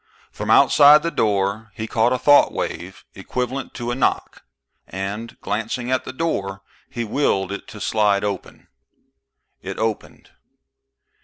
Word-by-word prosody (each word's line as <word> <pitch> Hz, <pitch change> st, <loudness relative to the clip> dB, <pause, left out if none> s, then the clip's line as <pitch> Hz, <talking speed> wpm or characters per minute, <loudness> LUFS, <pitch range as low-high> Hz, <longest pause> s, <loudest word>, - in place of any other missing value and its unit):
From -, -, -6 dB
outside 150 Hz, +1 st, +7 dB
the 170 Hz, -, -1 dB
door 105 Hz, 0 st, -1 dB
he 110 Hz, -, -4 dB
caught 115 Hz, +2 st, +1 dB
a 130 Hz, -, +1 dB
thought 145 Hz, +3 st, +5 dB
wave -, -, -5 dB
equivalent 125 Hz, +1 st, -4 dB
to 120 Hz, 0 st, -4 dB
a -, -, -2 dB
knock, 130 Hz, -, -1 dB, 0.5 s
and, 100 Hz, +4 st, -6 dB
glancing 115 Hz, +4 st, -3 dB
at 130 Hz, -, 0 dB
the -, -, -5 dB
door, 100 Hz, -10 st, -3 dB, 0.3 s
he 120 Hz, -, -4 dB
willed 105 Hz, -5 st, 0 dB
it 100 Hz, -, -6 dB
to 105 Hz, -, -10 dB
slide 105 Hz, -2 st, +1 dB
open. 100 Hz, -3 st, -5 dB, 0.9 s
It -, -, -6 dB
opened. 110 Hz, -1 st, -4 dB
110 Hz, 140 wpm, -21 LUFS, 100-130 Hz, 0.9 s, outside